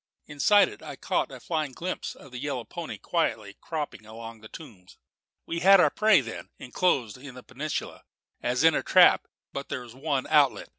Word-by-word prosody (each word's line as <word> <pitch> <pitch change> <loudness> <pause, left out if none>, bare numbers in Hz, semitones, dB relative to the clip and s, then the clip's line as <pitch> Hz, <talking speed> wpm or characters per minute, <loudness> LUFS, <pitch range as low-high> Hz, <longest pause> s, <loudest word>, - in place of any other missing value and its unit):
Inside 180 +8 +4
it 410 - -11
I - - -8
caught - - -1
a - - -9
flying 155 -5 -3
glimpse 180 +7 -5
of 140 - -15
the 125 - -7
yellow 135 -3 -3
pony 165 +8 -7
quietly 110 - -2
cropping 150 -8 -5
among 115 0 -10
the 110 - -11
tombs. 105 - -13 0.5
We 170 - -3
had 195 +3 +7
our - - +5
prey, 215 -6 +4
then, 115 -2 -8
enclosed 125 - -1
in 135 -1 -11
that 125 - -11
peninsula 145 +4 -5 0.4
as 125 +3 0
in 165 0 +6
a - - +1
trap; - - +5 0.3
but 140 0 -6
there 130 - -3
was 120 -2 -12
one 135 0 -2
outlet. 145 -4 +3
140 Hz, 190 wpm, -27 LUFS, 120-165 Hz, 0.5 s, had